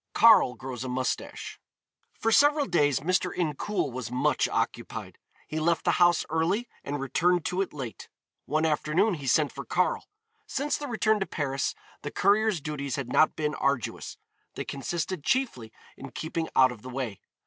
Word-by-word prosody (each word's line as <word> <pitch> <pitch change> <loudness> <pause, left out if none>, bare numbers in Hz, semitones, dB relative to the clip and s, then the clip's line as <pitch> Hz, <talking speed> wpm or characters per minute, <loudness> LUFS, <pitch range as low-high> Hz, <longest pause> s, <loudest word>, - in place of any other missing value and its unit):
KARL 220 - +6
GROWS 130 -2 -6
A 130 - -4
MOUSTACHE. 130 0 -3 0.6
For 225 - 0
several 290 +4 +5
days 145 - +2
Mr. 180 +2 +1
Incoul 165 0 -1
was 125 -2 -5
much 125 +1 +1
occupied. - - -3 0.3
He 155 - -3
left 165 +1 +1
the - - +2
house 175 -1 +5
early 175 +9 0 0.2
and 145 +1 -3
returned 175 +6 +1
to 180 +2 0
it 195 - -2
late. 130 -6 -7 0.4
One 155 +3 +1
afternoon 160 +7 +2
he 145 -5 -6
sent 145 +3 +3
for - - -7
Karl. - - 0 0.4
Since 285 +2 -1
the 290 - -5
return 220 -3 +2
to 195 - -2
Paris 135 -4 -2 0.3
the - - -4
courier's 210 -1 +2
duties 140 -3 -3
had 135 -4 -4
not 155 - +4
been 150 -1 -1
arduous; 140 -6 -2 0.4
they - - -4
consisted 160 +5 -3
chiefly 145 - 0 0.2
in 135 - -9
keeping 160 +4 -4
out 130 -1 +6
of 115 -4 -10
the 130 - -9
way. 125 -6 -4
155 Hz, 170 wpm, -27 LUFS, 135-185 Hz, 0.6 s, KARL